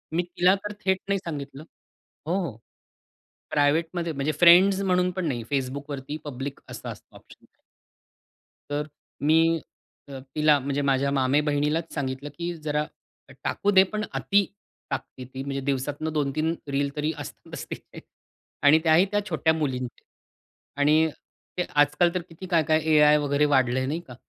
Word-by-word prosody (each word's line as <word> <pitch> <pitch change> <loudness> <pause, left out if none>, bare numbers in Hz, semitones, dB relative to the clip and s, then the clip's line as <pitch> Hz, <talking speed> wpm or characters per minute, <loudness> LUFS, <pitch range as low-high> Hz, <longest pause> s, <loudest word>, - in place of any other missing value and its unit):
मी 175 - +2
तिला 180 +2 +3
तर 205 +1 -6
थेट 190 -1 +3
नाही 200 0 +1
सांगितलं. 145 -5 -7 0.6
हो, 170 - +1
हो. 115 -8 -7 0.9
प्रायव्हेटमध्ये 165 +4 +1
म्हणजे 140 +1 -1
फ्रेंड्स 185 +3 +7
म्हणून 180 -1 +2
पण 185 0 -3
नाही, 120 -5 -2
Facebookवरती 140 +2 -3
पब्लिक 140 0 -5
असा - - -7
असतो - - -11
ऑप्शन. - - -17 1.2
तर 145 +1 -2 0.3
मी 165 +2 +4 0.5
अ, 135 -1 -7 0.2
तिला 150 -1 +5
म्हणजे 140 +1 -2
माझ्या 140 0 +1
मामेबहिणीलाच 145 +4 +1
सांगितलं 135 0 -3
की 175 0 -3
"जरा 150 0 0 0.6
टाकू 205 - 0
दे 190 -1 +7
पण 215 0 -1
अती 200 0 +2 0.5
टाकते 130 -2 -5
ती." 130 +1 -7
म्हणजे 135 0 -3
दिवसातनं 145 +3 -2
2-3 155 +2 0
रील 140 0 0
तरी 150 +1 0
अस 145 - -6 0.2
अस - - -5
तीलच. - - -9 0.6
आणि 150 +2 +7
त्याही 165 +3 +5
त्या 205 - +2
छोट्या 160 - +2
मुलींचे. 130 -6 -3 0.7
आणि 155 +3 +4 0.5
ते 180 - +2
आज-काल 145 +4 +4
तर 180 - 0
किती 165 +3 -10
काय-काय 155 -2 +3
ए-आय 150 0 +6
वगैरे 145 0 +1
वाढलंय, 130 0 +2
नाही 150 +5 -2
का? 125 - -10
150 Hz, 145 wpm, -25 LUFS, 140-170 Hz, 1.2 s, फ्रेंड्स